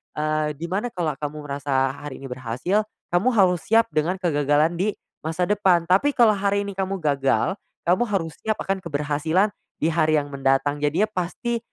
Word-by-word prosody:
eee, 155 0 -1
di 165 +4 -5
mana 205 +6 0
kalo 175 -8 -2
kamu 150 0 -5
merasa 140 -2 0
hari 145 0 -8
ini 135 - -7
berhasil, 130 - -1 0.2
kamu 175 +7 +2
harus 180 -4 +4
siap 225 -2 +4
dengan 155 +4 +1
kegagalan 150 -3 +2
di 205 +3 0 0.2
masa 160 +3 -2
depan, 185 -3 +3
tapi 195 +12 +2
kalau 235 -3 +6
hari 200 0 0
ini 200 - -5
kamu 195 0 -2
gagal, 145 +6 +1 0.2
kamu 180 +7 +3
harus 185 -6 -1
siap 220 0 -1
akan 195 0 -1
keberhasilan 160 +4 0 0.3
di 165 - +3
hari 155 -1 +2
yang 145 -1 -1
mendatang, 135 +1 +1
jadinya 150 +9 +1
pasti, 230 +6 -2
165 Hz, 175 wpm, -23 LUFS, 145-195 Hz, 0.3 s, kalau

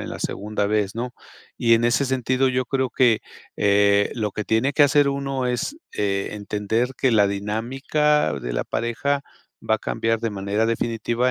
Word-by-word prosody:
en - - -6
la - - -6
segunda 105 0 -2
vez, 105 -1 0
¿no? 120 +2 -3 0.5
Y 115 -1 +4
en 115 +1 +2
ese 120 +4 +2
sentido, 130 0 +1
yo 130 0 0
creo 130 -1 -1
que, 120 -5 +3 0.4
eh, 100 0 +3
lo 105 -4 -2
que 105 - -4
tiene 110 +7 +1
que 145 - +4
hacer 145 0 +4
uno 135 -2 -2
es, 125 - -2 0.2
eh, 100 -1 -1
entender 105 +4 -1
que 130 - +2
la 105 -3 +4
dinámica 130 +9 0
de - - -5
la - - -1
pareja 140 +5 -1 0.4
va 110 0 +2
a - - -17
cambiar 115 +1 -1
de 115 - -1
manera 100 +2 -1
definitiva 115 +2 0
115 Hz, 180 wpm, -23 LUFS, 105-130 Hz, 0.5 s, Y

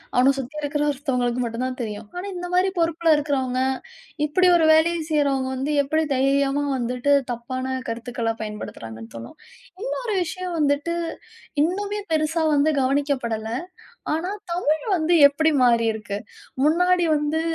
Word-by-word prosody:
அவனை 260 +2 +5
சுத்தி 270 +3 -6
இருக்குற 290 0 -1
ஒருத்தவங்களுக்கு 250 -3 -1
மட்டும் 230 +1 -3
தான் 255 0 -4
தெரியும். 210 -1 -5
ஆனா 360 +2 -4
இந்த 355 0 -5
மாரி 375 +1 +3
பொறுப்புல 330 0 +3
இருக்கிறவங்க, 265 -3 -1 0.6
இப்படி 360 +5 +3
ஒரு 320 -2 +3
வேலையை 335 +2 +3
செய்றவங்க 275 -3 +1
வந்து 280 +3 -2
எப்படி 315 +3 +1
தைரியமா 275 +2 +2
வந்துட்டு 250 +3 0 0.2
தப்பான 255 +2 -3
கருத்துக்கள 235 0 -2
பயன்படுத்துறாங்கன்னு 115 - -8
தோணும். 115 +1 -9 0.5
இன்னொரு 455 -5 -2
விஷயம் 360 +1 -4
வந்துட்டு, 290 +4 +1 0.7
இன்னுமே 410 +4 -2
பெரிசா 315 +1 +1
வந்து 295 +2 +3
கவனிக்கப்படல, 260 -5 0 0.7
ஆனா 355 +5 -3 0.2
தமிழ் 310 -3 0
வந்து 330 +2 +2
எப்படி 315 +2 +1
மாறி 235 -1 +3
இருக்கு. 205 -2 -5 0.5
முன்னாடி 355 +3 +3
வந்து 300 +2 -1
285 Hz, 135 wpm, -23 LUFS, 250-320 Hz, 0.7 s, அவனை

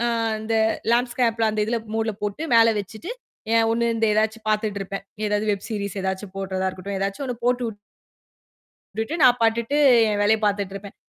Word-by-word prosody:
ஆ - - +2 0.3
அந்த 220 +1 -3 0.4
லேண்டுஸ்கேப் 240 -1 +1
அந்த 215 0 -2
இதுல 235 +2 -1 0.2
மோடுல 225 0 0
போட்டு 210 +8 -3
மேல 230 0 +7
வச்சிட்டு 220 - -8 0.6
ஒண்ணு, 235 +1 +1
இந்த 225 0 0
ஏதாச்சும் 220 +1 0
பாத்துட்டு 215 -1 0
இருப்பேன். 195 0 -5 0.2
ஏதாவது 210 0 0
வெப் 200 -1 -3
சீரீஸ் 200 -2 -3
ஏதாச்சும் 190 +1 -4
போட்டுறதா 190 -1 -2
இருக்கட்டும். 195 +2 -6
ஏதாச்சு 195 +6 -3
ஒண்ணு 250 - -3
போட்டு 245 0 +1 1.3
வுட்டுட்டு 225 +8 -2
நான் 250 -1 +6
பாட்டுக்கு 230 +4 +1 0.3
என் 205 -1 0
வேலைய 220 +2 +4
பாத்துட்டு 200 -2 0
இருப்பேன். 200 0 -8
215 Hz, 160 wpm, -23 LUFS, 200-230 Hz, 1.3 s, மேல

